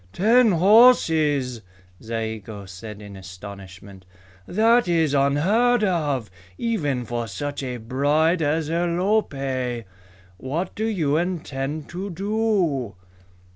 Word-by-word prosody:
"Ten 225 +2 +4
horses!" 160 - +4 0.4
Zayigo 110 -2 -5
said 100 +3 -10
in 100 -1 -10
astonishment. 95 0 -11 0.4
"That 225 +3 +3
is 165 -4 +2
unheard 190 - +2
of, 145 - -1 0.3
even 150 - -1
for 120 0 -3
such 145 +8 -5
a 125 -2 -4
bride 145 +8 +1
as 155 +1 0
Alope! 160 - -1 0.5
What 155 - -4
do 220 - -3
you 160 -9 0
intend 155 -4 -3
to 185 +4 -5
do?" 190 - -1
145 Hz, 100 wpm, -23 LUFS, 120-185 Hz, 0.5 s, Ten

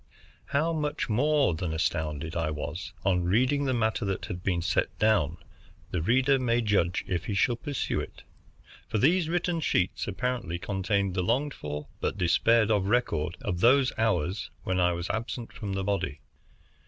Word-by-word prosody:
How 160 +4 0
much 150 -4 -2
more 140 - +3
than 80 0 -3
astounded 80 0 -2
I 80 -2 0
was 75 +2 -5
on 90 -2 +2
reading 130 +10 +2
the 130 - +1
matter 110 0 0
that 95 -1 -2
had 90 -4 -6
been 90 -2 0
set 90 +1 0
down, 90 -7 +2 0.5
the 90 - -1
reader 130 - +3
may 120 -1 +1
judge 100 -5 +1
if 90 -1 -2
he 105 - -2
shall 120 +5 +3
peruse 145 +3 -3
it. - - -3 0.6
For - - -1
these 160 - +3
written 175 0 0
sheets 90 - 0
apparently 120 -4 -2
contained 100 +1 -1
the 90 - 0
longed 130 +10 0
for 75 0 -5
but - - -2
despaired 110 +5 +3
of 100 -3 +2
record 90 -8 0
of 95 -6 -2
those 130 +5 +4
hours 105 -4 0
when 95 0 0
I 90 0 +4
was 85 +1 -4
absent 115 +1 -4
from 100 -2 -5
the 95 0 -2
body. 95 -7 -2
100 Hz, 170 wpm, -28 LUFS, 90-125 Hz, 0.6 s, those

